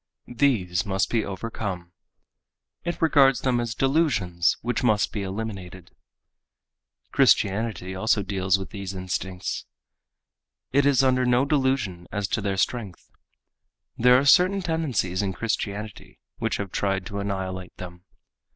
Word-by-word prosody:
These 115 -9 +1
must 95 -1 -1
be 115 -2 +1
overcome. 95 -3 -5 0.9
It 170 -1 -3
regards 140 -4 +5
them 125 -2 +1
as 115 -2 -3
delusions 130 - +1
which 125 +2 -1
must 110 -4 +2
be 105 - -2
eliminated. 95 -3 -6 1.2
Christianity 100 -2 +2
also 110 +2 +1
deals 95 -1 +1
with 95 - -8
these 100 -2 -6
instincts. 90 0 -4 1.0
It 140 +1 +3
is 135 -2 +4
under 130 -1 +3
no 125 +1 +3
delusion 130 - 0
as 105 -2 -2
to 110 - -1
their 100 -1 -1
strength. 100 -2 -3 0.8
There 125 +1 +5
are 135 - +1
certain 185 +6 +5
tendencies 135 - -1
in 100 -2 -2
Christianity 105 -1 -4 0.2
which - - -1
have 100 -2 -5
tried 95 -2 -1
to 100 +2 -5
annihilate 95 -2 -4
them. 90 0 -10
105 Hz, 130 wpm, -25 LUFS, 95-125 Hz, 1.2 s, regards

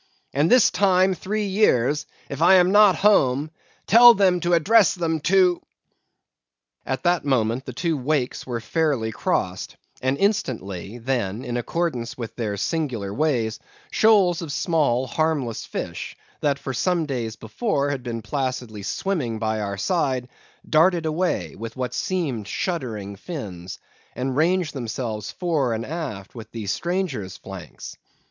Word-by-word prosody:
and 145 +4 +2
this 250 -3 +6
time 185 0 +3
three 210 +3 -3
years, 150 - +2 0.2
if 140 - -6
I 180 +3 +7
am 180 0 +5
not 205 -2 +6
at - - -8
home, 150 -8 +3 0.3
tell 240 +2 +8
them 185 -2 +3
to 175 +1 0
address 205 +5 +4
them 165 -3 -1
to 180 +2 +3 0.6
——" 65 0 -56
At 130 0 -2
that 175 -1 +2
moment 130 -2 0
the 130 - -6
two 165 +6 -1
wakes 135 -2 -1
were 120 -2 -2
fairly 140 -6 0
crossed, - - -2 0.2
and 130 +2 0
instantly, 120 - -2
then, 120 -2 -2
in 120 -1 -3
accordance 125 -1 -2
with 115 -3 -6
their 105 -4 -3
singular 120 - -2
ways, 120 -5 0 0.3
shoals 195 -6 +4
of 160 -4 -5
small 140 -6 +1
harmless 145 -6 -1
fish, - - -6 0.2
that 145 -2 +1
for 135 -1 -5
some 175 +4 +1
days 120 -6 -3
before 145 - -1
had 135 -2 -3
been 115 -2 -5
placidly 125 -4 -3
swimming 130 - -2
by 110 0 -1
our 100 -1 -3
side, 130 - 0 0.4
darted 165 +1 +3
away 155 - -1
with 115 +1 -7
what 125 -1 -3
seemed 140 - -2
shuddering 110 - -3
fins, 95 - -7 0.4
and 130 0 -2
ranged 170 +2 +1
themselves 115 -4 -4
fore 155 -9 0
and 110 - -4
aft 140 - -6
with 115 -3 -10
the 115 -2 -5
stranger's 135 - -2
flanks. - - -9
140 Hz, 150 wpm, -23 LUFS, 115-175 Hz, 0.6 s, tell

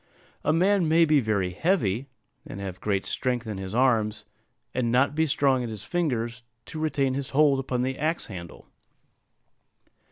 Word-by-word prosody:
A - - +2
man 185 +2 +3
may 165 +1 +5
be 150 -2 +4
very 100 -6 0
heavy, 130 - 0 0.4
and 95 - -8
have 95 -2 -6
great 100 -2 0
strength 125 -2 -1
in 105 -3 -5
his 95 +2 -5
arms, 110 -5 +2 0.5
and 120 -2 0
not 130 +4 +3
be 160 +1 +1
strong 135 -2 +2
in 120 - -4
his 110 -2 -7
fingers 120 -5 -2 0.2
to 160 - -7
retain 140 -4 0
his 140 0 -4
hold 145 -3 +5
upon 125 -2 -1
the 130 +1 -2
axe 160 +3 -1
handle. 85 -5 -9
130 Hz, 165 wpm, -26 LUFS, 110-150 Hz, 0.5 s, may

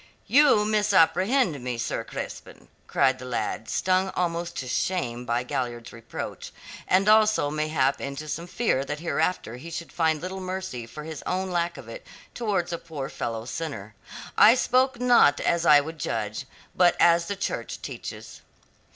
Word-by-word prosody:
"You 265 -6 +5
misapprehend 195 - +2
me, 125 -1 -3
Sir 115 - -2
Crispin," - - -8 0.2
cried 130 0 +2
the 130 - -8
lad, 120 -2 -3
stung 185 +1 +1
almost 170 -1 -2
to 130 - -4
shame 125 -5 -2
by 120 +1 0
Galliard's 120 -3 -4
reproach, 115 -1 -7 0.4
and 190 +2 +3
also 215 -8 +4
mayhap 155 -3 0
into 140 +2 -5
some 165 +4 -4
fear 180 - 0
that 145 +2 -4
hereafter 160 -7 -1
he 155 +7 -9
should 170 0 -6
find 160 -2 +1
little 185 +3 -6
mercy 185 -11 -5
for 150 +6 -9
his 160 -2 -7
own 185 +1 -1
lack 170 0 -1
of - - -10
it - - -9 0.3
towards 205 -7 -1
a 170 - -3
poor 150 -5 -6
fellow 115 -1 -4
sinner. 120 -8 -6 0.4
"I 225 +3 +7
spoke 255 0 +2
not 240 -13 +5
as 170 0 +1
I 150 -1 +8
would 160 +2 -8
judge, 115 +1 -3 0.3
but 180 -1 +4
as 170 0 +4
the 200 - -2
Church 195 - -4
teaches." - - -8
165 Hz, 160 wpm, -26 LUFS, 135-190 Hz, 0.4 s, I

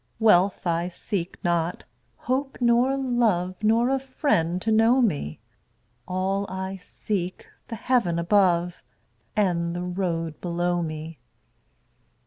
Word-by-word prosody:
Wealth 200 -4 +4
I 170 0 0
seek 180 0 -4
not, 170 -1 0 0.3
hope 270 +2 -2
nor 245 +2 +3
love, 225 -9 +1
Nor 230 +3 +3
a 270 - +2
friend 260 - 0
to 225 - 0
know 225 +4 +4
me; 150 - 0 0.7
All 190 +2 -1
I 190 +1 -4
seek, 185 0 -4 0.2
the 230 - -5
heaven 225 -7 +1
above 175 -1 +2 0.5
And 175 -4 +1
the 175 - -3
road 170 -3 -3
below 175 0 0
me. 155 0 -6
185 Hz, 115 wpm, -25 LUFS, 170-225 Hz, 0.7 s, Wealth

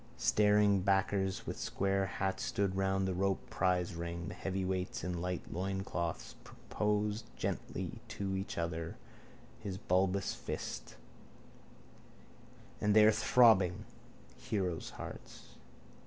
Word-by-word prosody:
Staring 105 -1 +4
backers 95 0 +1
with - - -5
square 95 0 0
hats 95 0 -2
stood 100 -2 0
round 95 0 +1
the 95 - 0
roped 95 +1 -1
prizering. 85 -1 -1
The - - -6
heavyweights 95 -2 -2
in 90 0 -2
tight 90 0 -2
loincloths 95 -2 -3
proposed 105 +1 -1
gently 95 +5 -3
each 95 -2 -3
to - - -3
other 80 0 -4 0.6
his 100 -4 -5
bulbous 95 +1 +1
fists. - - -5 1.9
And 105 0 +3
they 110 -1 +8
are 110 - +8
throbbing: 110 -5 +5 0.5
heroes' 95 -8 -2
hearts. - - -9
95 Hz, 110 wpm, -34 LUFS, 90-100 Hz, 1.9 s, they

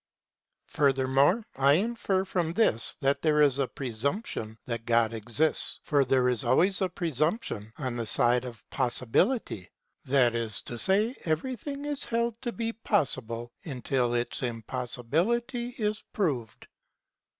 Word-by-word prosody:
Furthermore 140 - +2
I 135 +1 +5
infer 195 0 0
from 175 -4 -1
this 170 - +2
that 140 +1 +1
there 155 -2 +2
is 140 -2 +4
a 135 - +1
presump 140 - -3
tion 110 0 -6
that 115 -2 -5
God 115 -1 +3
exists 120 +8 0
for 145 -2 +3
there 130 -1 +2
is 125 -3 0
always 185 +8 +2
a 190 - +1
presumption 155 - -2
on 130 -5 -3
the 115 - -2
side 120 +3 +3
of 120 -3 -10
possibility; 125 - 0 0.4
that 125 -3 +3
is 115 -3 -3
to 120 - -6
say 210 - +4
everything 260 - -3
is 290 -1 -1
held 235 0 -1
to 240 - -3
be 230 0 -3
possible 120 - 0
until 125 -4 -1
its 120 0 -2
impossibility 150 - -2
is 210 -2 -2
proved. 135 - -2
140 Hz, 140 wpm, -28 LUFS, 120-200 Hz, 0.4 s, I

